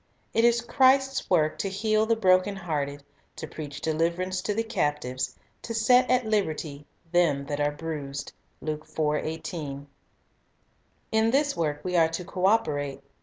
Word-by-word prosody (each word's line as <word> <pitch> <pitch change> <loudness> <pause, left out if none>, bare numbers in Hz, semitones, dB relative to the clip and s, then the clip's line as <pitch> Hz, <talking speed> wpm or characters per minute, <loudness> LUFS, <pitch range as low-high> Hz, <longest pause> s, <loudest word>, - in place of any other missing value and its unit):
It 230 - +3
is 235 0 +4
Christ's 265 +2 +3
work 155 -4 +2
"to 195 - -1
heal 215 +2 +1
the 230 - +3
broken 190 -1 +3
hearted, 145 -6 -3 0.3
to - - -6
preach 150 -2 -7
deliverance 170 +4 0
to 205 +2 -2
the 225 - +1
captives,... 130 - -2 0.3
to 230 - -5
set 250 +3 +4
at 250 -1 +3
liberty 155 -9 -2 0.2
them 160 -6 +2
that 145 0 -3
are 145 - +3
bruised." 145 -3 -5 0.3
1 155 -1 -3 1.3
In 220 0 +3
this 280 +3 +2
work 150 -3 -1
we 180 -1 -2
are 165 -2 +5
to 165 +2 -4
co 185 +1 0
operate. 145 -10 0
170 Hz, 145 wpm, -27 LUFS, 150-220 Hz, 1.3 s, are